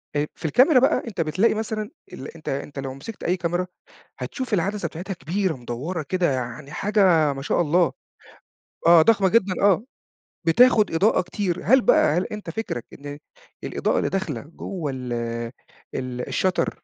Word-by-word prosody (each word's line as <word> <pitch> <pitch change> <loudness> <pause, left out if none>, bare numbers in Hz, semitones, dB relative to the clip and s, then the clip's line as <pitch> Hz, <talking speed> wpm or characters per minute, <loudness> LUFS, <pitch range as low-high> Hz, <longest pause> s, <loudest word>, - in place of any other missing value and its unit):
أ 145 0 +1
في - - -10
الكاميرا 255 - +5
بقى 260 - +2
أنت 190 -6 -3
بتلاقي 170 +9 +2
مثلًا 215 -1 -3 0.2
ال 135 - -7
أنت 160 - -7
أنت 140 +1 -4
لو 135 -1 -4
مسكت 145 +12 -9
أي 180 +2 +1
كاميرا، 175 +1 -1 0.5
هتشوف 255 -5 -4
العدسة 200 +3 0
بتاعتها 185 +4 -6
كبيرة 185 +1 -1
مدوّرة 135 +8 -4
كده 180 -1 0
يعني 130 +3 -4
حاجة 180 -6 +3
ما 135 - -7
شاء 145 - +1
الله، 170 +1 +3 1.0
آه 170 -1 +8
ضخمة 200 0 +4
جدًا 195 -3 +3
آه، 200 0 +4 0.6
بتاخد 220 +4 +5
إضاءة 195 +7 +3
كتير، 180 -1 -2
هل 260 +4 +6
بقى 155 -8 +4
هل 180 - +1
أنت 210 -5 -7
فكرك 165 - -4
إن 145 0 -8 0.5
الإضاءة - - 0
اللي - - 0
داخلة 165 -11 -2
جوا 165 0 -5
ال 125 -2 -5 0.8
ال 125 -1 -4
الshutter 185 -2 +1
175 Hz, 160 wpm, -23 LUFS, 145-205 Hz, 1.0 s, آه